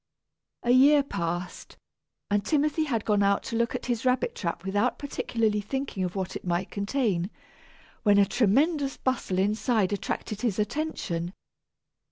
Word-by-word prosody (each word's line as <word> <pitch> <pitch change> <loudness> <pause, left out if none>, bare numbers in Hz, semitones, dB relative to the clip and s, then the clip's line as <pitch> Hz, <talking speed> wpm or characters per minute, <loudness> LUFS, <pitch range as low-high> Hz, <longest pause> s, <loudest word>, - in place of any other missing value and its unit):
A 240 - +2
year 280 +3 +6
passed, 175 -7 -4 0.5
and 205 0 +2
Timothy 305 +5 +1
had 230 -7 -1
gone 205 -2 +2
out 200 0 +2
to 230 - -4
look 235 0 0
at - - -4
his 240 -2 -1
rabbit 255 -1 +1
trap 170 0 -4
without 205 +6 +1
particularly 230 -6 -1
thinking 265 -2 -3
of 180 +1 -3
what 190 -1 -3
it - - -5
might 175 +1 -1
contain, 200 -4 0 0.7
when 205 -2 +4
a 200 - +6
tremendous 270 - +2
bustle 255 -8 -1
inside 210 +1 +1
attracted 205 +1 -3
his 225 -6 0
attention. 210 - -2
215 Hz, 150 wpm, -27 LUFS, 195-260 Hz, 0.7 s, year